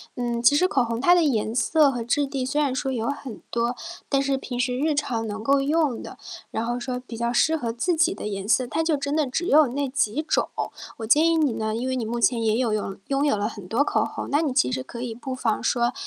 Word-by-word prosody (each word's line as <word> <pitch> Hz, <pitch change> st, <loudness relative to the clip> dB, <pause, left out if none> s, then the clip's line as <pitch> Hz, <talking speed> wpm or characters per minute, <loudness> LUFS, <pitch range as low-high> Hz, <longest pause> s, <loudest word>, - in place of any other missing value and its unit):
嗯， 240 Hz, -1 st, -2 dB
其 240 Hz, +5 st, +5 dB
实 365 Hz, +5 st, +3 dB
口 265 Hz, -7 st, +2 dB
红 230 Hz, +1 st, -3 dB
它 350 Hz, -, +6 dB
的 355 Hz, -, +4 dB
颜 225 Hz, -7 st, +1 dB
色 285 Hz, +4 st, +3 dB
和 245 Hz, -3 st, -4 dB
质 265 Hz, +5 st, +1 dB
地 270 Hz, -2 st, -3 dB
虽 295 Hz, +3 st, 0 dB
然 275 Hz, -3 st, +1 dB
说 265 Hz, 0 st, -2 dB
有 230 Hz, -1 st, -2 dB
很 275 Hz, -5 st, -6 dB
多， 235 Hz, +1 st, 0 dB, 0.3 s
但 275 Hz, -1 st, +2 dB
是 275 Hz, -1 st, 0 dB
平 250 Hz, -2 st, -6 dB
时 250 Hz, 0 st, 0 dB
日 305 Hz, 0 st, +1 dB
常 230 Hz, -6 st, -1 dB
能 215 Hz, +1 st, -5 dB
够 275 Hz, +2 st, +3 dB
用 290 Hz, -2 st, +1 dB
的， -, -, -9 dB, 0.3 s
然 225 Hz, -, -2 dB
后 240 Hz, +1 st, -2 dB
说 250 Hz, 0 st, -4 dB
比 230 Hz, -2 st, -8 dB
较 235 Hz, +1 st, -1 dB
适 320 Hz, +6 st, +3 dB
合 230 Hz, -5 st, -3 dB
自 345 Hz, +9 st, 0 dB
己 335 Hz, +3 st, +3 dB
的 -, -, -7 dB
颜 195 Hz, -1 st, -4 dB
色， 250 Hz, +3 st, +3 dB
它 320 Hz, -, -1 dB
就 320 Hz, -2 st, +1 dB
真 280 Hz, 0 st, -3 dB
的 300 Hz, -, +2 dB
只 325 Hz, +7 st, -2 dB
有 300 Hz, -1 st, +6 dB
那 275 Hz, +2 st, -2 dB
几 270 Hz, 0 st, 0 dB
种。 315 Hz, -, 0 dB, 0.5 s
我 225 Hz, -, -4 dB
建 300 Hz, +9 st, +5 dB
议 330 Hz, -, +3 dB
你 305 Hz, -5 st, +2 dB
呢， 220 Hz, 0 st, -2 dB
因 250 Hz, +3 st, -2 dB
为 260 Hz, -, -1 dB
你 235 Hz, -, -2 dB
目 235 Hz, +2 st, -3 dB
前 235 Hz, -1 st, +3 dB
也 220 Hz, -1 st, +2 dB
有 235 Hz, -2 st, +1 dB
用 205 Hz, -2 st, -2 dB
拥 275 Hz, +1 st, +1 dB
有 285 Hz, -, +3 dB
了 205 Hz, +1 st, -1 dB
很 205 Hz, -5 st, -10 dB
多 230 Hz, +8 st, +2 dB
口 -, -, +1 dB
红， -, -, -6 dB
那 290 Hz, -, +3 dB
你 295 Hz, -5 st, -1 dB
其 125 Hz, -, +2 dB
实 130 Hz, -, -2 dB
可 235 Hz, -, -8 dB
以 240 Hz, -2 st, -4 dB
不 255 Hz, +3 st, -6 dB
妨 230 Hz, -4 st, -1 dB
说， 240 Hz, -1 st, +1 dB
255 Hz, 290 characters per minute, -24 LUFS, 230-285 Hz, 0.5 s, 它